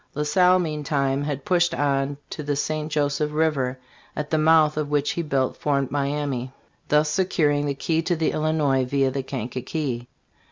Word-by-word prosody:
La 150 - 0
Salle 180 +4 +4
meantime 145 -4 -1
had 140 -2 -4
pushed 175 -1 +2
on 140 -1 0
to - - -5
the 145 -1 -1
St. 155 +2 -2
Joseph 145 0 0
river, 145 -5 0 0.4
at 150 0 -4
the 160 - +3
mouth 155 -1 +4
of 150 -1 -2
which 145 -1 +1
he 170 - -2
built 135 -5 -1
Fort 140 -3 0
Miamis, 140 -2 -2 0.4
thus 150 +1 +3
securing 150 -4 +1
the 140 - -1
key 160 +3 0
to 175 +2 0
the 160 -1 0
Illinois 150 -4 +1
via 135 +1 +1
the 135 +1 -2
Kankakee. 130 0 -4
145 Hz, 170 wpm, -24 LUFS, 140-155 Hz, 0.4 s, Salle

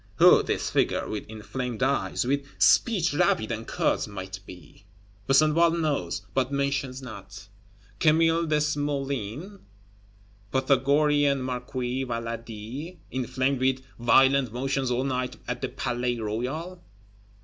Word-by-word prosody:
Who - - +7
this - - -2
figure - - +1
with 105 - -5
inflamed 120 +3 -4
eyes, 135 -2 0
with 140 +2 0
speech 185 -9 +4
rapid 145 -9 +2
and 115 0 -4
curt, - - 0
might 95 -2 -7
be? 90 +3 -14 0.4
Besenval 155 +4 +4
knows, 100 - -1
but 130 0 0
mentions 140 -1 -1
not. 100 -4 -10 0.5
Camille 165 +1 +3
Desmoulins? 145 - -2 0.9
Pythagorean 140 +1 +2
Marquis 125 0 -3
Valadi, 115 +6 -6
inflamed 130 +1 -1
with 130 0 +1 0.2
"violent 135 +1 +4
motions 135 +2 -1
all 125 +1 0
night 125 -2 -2
at - - -3
the - - -2
Palais 120 0 -2
Royal"? 130 +12 -4
130 Hz, 115 wpm, -26 LUFS, 120-145 Hz, 0.9 s, Who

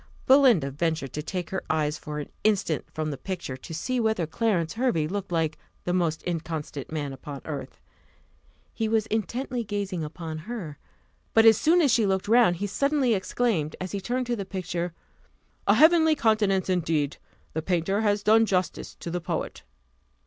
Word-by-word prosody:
Belinda 250 - +5
ventured 155 -2 -2
to 150 - -3
take 175 +2 -4
her 190 - -2
eyes 150 -1 +1
for 150 0 -6
an 150 - -5
instant 200 -7 +1
from 155 -1 -3
the 140 - -6
picture, 175 -6 -5
to 130 - -11
see 245 +11 -2
whether 220 -6 +1
Clarence 170 -2 0
Hervey 225 -11 +1
looked 195 +1 -4
like 160 -2 0 0.2
the 180 - -1
most 170 -3 0
inconstant 160 -5 -4
man 145 -3 -3
upon 140 0 -8
earth. 150 -3 -6 0.9
He 225 - -1
was 220 -1 +2
intently 240 +3 -2
gazing 200 -5 -3
upon 155 +1 -6
her; 175 -12 -6 0.6
but 225 0 +7
as 225 -1 +9
soon 340 +3 +4
as 280 - +4
she 225 -4 +3
looked 190 0 0
round, 230 -5 +5
he 195 +4 -3
suddenly 275 +4 +1
exclaimed, 190 -5 0
as 185 0 -4
he 200 - -3
turned 250 +5 -1
to 240 0 -1
the 200 - -4
picture 180 -2 -3 0.8
"A - - +6
heavenly 320 0 +6
countenance, 215 -6 +2
indeed! 160 -5 0 0.4
the 160 - -1
painter 180 +4 0
has 205 -1 +1
done 225 +1 +5
justice 185 -3 -1
to 170 - -5
the 180 +1 -2
poet." - - -4
185 Hz, 175 wpm, -26 LUFS, 160-225 Hz, 0.9 s, as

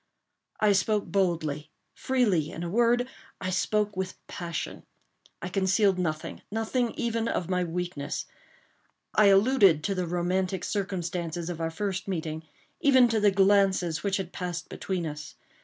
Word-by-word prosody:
I 210 -1 +4
spoke 205 +1 +2
boldly, 160 -6 -1 0.2
freely—in 185 - 0
a 170 - -3
word, 240 +3 +3 0.3
I 185 -1 -3
spoke 210 +2 0
with 185 0 -3
passion. 170 -2 -5 0.6
I - - -2
concealed 190 +1 +2
nothing—nothing 220 +8 -2
even 230 -1 -1
of 185 -4 -2
my 180 0 +1
weakness. 175 -4 -3 0.9
I 210 - +5
alluded 195 - +5
to 200 - 0
the 180 -2 -2
romantic 180 +2 -1
circumstances 175 -4 -3
of 165 -1 -6
our 165 - 0
first 185 +2 -3
meeting—even 180 - +1
to 225 -1 +1
the 210 -1 +5
glances 195 -4 +3
which 195 +1 0
had 190 -2 -5
passed 175 -1 -4
between 185 -3 -3
us. 150 0 -7
185 Hz, 135 wpm, -28 LUFS, 170-205 Hz, 0.9 s, I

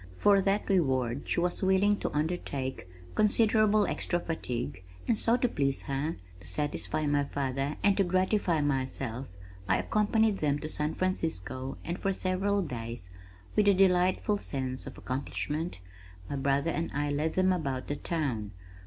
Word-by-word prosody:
For 200 - +5
that 195 +2 +1
reward 130 - +1
she - - +2
was 175 0 0
willing 190 +2 +4
to - - -1
undertake 150 - -2 0.3
considerable 215 - +4
extra 175 - -1
fatigue 120 - -4 0.2
and 230 - +3
so 230 +3 +2
to 250 - +2
please 135 - -1
her, 140 +4 -2 0.2
to 85 - -11
satisfy 145 - -1
my 145 -1 +2
father 140 +1 -2
and 200 -1 +5
to 200 - +4
gratify 185 -2 +2
myself, 130 -3 -2 0.4
I 95 - +4
accompanied 215 -1 +2
them 145 -2 +1
to 155 - -5
San 150 0 -2
Francisco 135 - -2
and 170 +2 -3
for 195 - 0
several 195 +2 0
days 115 - -6 0.4
with 210 - +4
a 200 - +6
delightful 185 +2 +3
sense 130 -5 -4
of - - -8
accomplishment, 145 - -3 0.5
my - - -3
brother 140 +3 +1
and 165 0 -2
I 145 0 0
led 150 +3 -1
them 185 0 +4
about 135 -7 -2
the 145 - -1
town. 130 - -2
155 Hz, 155 wpm, -30 LUFS, 135-190 Hz, 0.5 s, a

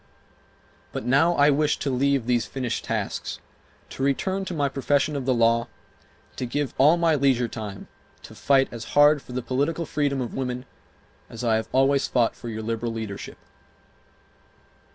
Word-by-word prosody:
But - - -5
now 140 +8 +3
I 145 +1 +5
wish 150 +1 +1
to 140 - -2
leave 135 -1 +1
these 120 -1 +1
finished 125 -3 -3
tasks, - - -3 0.5
to - - -7
return 190 +8 0
to 185 - -5
my 145 -2 +1
profession 140 +2 0
of 135 -3 -3
the 130 - +4
law, 115 0 +3 0.6
and - - -30
to 125 - -3
give 145 +1 -2
all 150 +6 +6
my 170 -1 +3
leisure 135 -4 +2
time 105 -4 -7 0.4
to - - -11
fight 135 -1 +3
as 115 -1 -7
hard 145 0 +6
for 125 - -11
the 125 0 -3
political 145 +7 -1
freedom 145 -2 -1
of 125 -2 -4
women 125 -1 -3 0.6
as 115 - -8
I 115 -2 +2
have 110 - -4
always 135 +1 +3
fought 120 -3 +1
for 120 - -8
your 110 -1 -5
liberal 115 +1 -3
leadership. 110 -3 -6
135 Hz, 175 wpm, -25 LUFS, 120-145 Hz, 0.6 s, all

